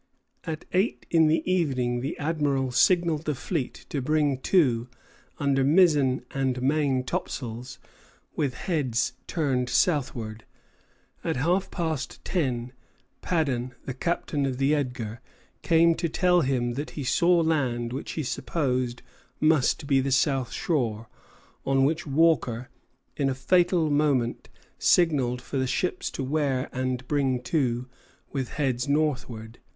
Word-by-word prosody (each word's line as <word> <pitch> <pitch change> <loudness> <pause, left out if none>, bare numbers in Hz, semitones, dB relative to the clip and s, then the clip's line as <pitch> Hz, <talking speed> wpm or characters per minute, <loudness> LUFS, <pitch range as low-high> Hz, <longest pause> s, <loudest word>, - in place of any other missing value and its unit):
At 160 -2 -5
eight 190 +5 0
in 160 -2 +5
the 155 +1 +2
evening 130 -9 +1
the 140 +6 -4
Admiral 145 -4 0
signalled 170 +2 +3
the 150 - -1
fleet 145 0 -4
to 140 - -2
bring 145 -1 +1
to, 130 -8 +2 0.5
under 140 -2 +1
mizzen 145 -4 +4
and 130 -2 -1
main 135 -1 +1
topsails, 125 -1 -5 0.6
with 135 -4 -1
heads 140 -9 -1
turned 130 -6 0
southward. 120 -10 0 0.8
At - - -1
half 175 +9 +1
past 160 -6 -4
ten, 125 -8 -1 0.5
Paddon, 130 -8 -1
the 135 - -4
captain 145 0 -1
of 130 -2 -3
the 135 +2 +2
"Edgar," 125 -6 -3 0.4
came 165 0 +4
to 170 0 -2
tell 180 +2 +3
him 125 -4 0
that 145 +5 -4
he 145 - -2
saw 170 +6 +3
land 125 -7 0
which 135 - -5
he 155 - -2
supposed 125 -3 -2 0.4
must 155 -1 +2
be 140 -1 +3
the 135 +1 -1
south 135 -2 +1
shore; 115 -9 -1 0.5
on 135 0 +2
which 160 +3 -1
Walker, 135 -5 +2 0.5
in 140 -1 +1
a 130 - -1
fatal 175 +3 +2
moment, 145 -5 +1 0.3
signalled 135 -8 +2
for 140 - -4
the 130 0 0
ships 180 +7 -1
to 135 - -5
wear 135 -2 0
and 130 0 -2
bring 135 -3 +1
to, 125 -4 0 0.5
with 135 -3 -3
heads 130 -2 -1
northward. 130 -7 -1
135 Hz, 135 wpm, -26 LUFS, 125-155 Hz, 0.8 s, in